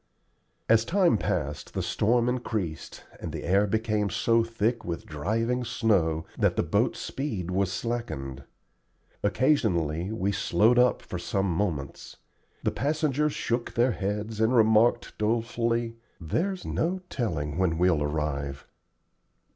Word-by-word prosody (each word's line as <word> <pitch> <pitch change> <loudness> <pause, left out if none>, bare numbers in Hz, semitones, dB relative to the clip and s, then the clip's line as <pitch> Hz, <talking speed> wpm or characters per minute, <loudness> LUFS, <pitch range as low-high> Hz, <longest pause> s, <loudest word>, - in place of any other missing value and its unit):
As 110 0 +5
time 180 - +3
passed, - - -3
the - - -1
storm 120 +3 +2
increased, 110 -10 -3 0.2
and - - -5
the - - -5
air 100 +4 +3
became 105 -1 0
so 115 +3 +2
thick 115 0 -1
with 85 -5 -5
driving 115 +11 -1
snow 100 -10 +1
that - - +3
the - - +1
boat's - - +1
speed 105 - -4
was 95 0 +1
slackened. 95 - -4 0.8
Occasionally 100 - +1
we 100 -3 0
"slowed 110 +3 +3
up" 125 0 +3
for - - -5
some 95 0 -1
moments. 85 -6 -3 0.5
The - - +1
passengers 150 0 0
shook 120 0 -2
their 120 +2 +3
heads 105 +1 -3
and 115 +3 +3
remarked, 110 +1 +4
dolefully, 115 +1 0 0.2
"There's 180 - -2
no 185 +3 -1
telling 80 - -2
when 85 -4 +1
we'll 90 -3 +3
arrive." 75 -2 -2
110 Hz, 130 wpm, -27 LUFS, 90-120 Hz, 0.8 s, As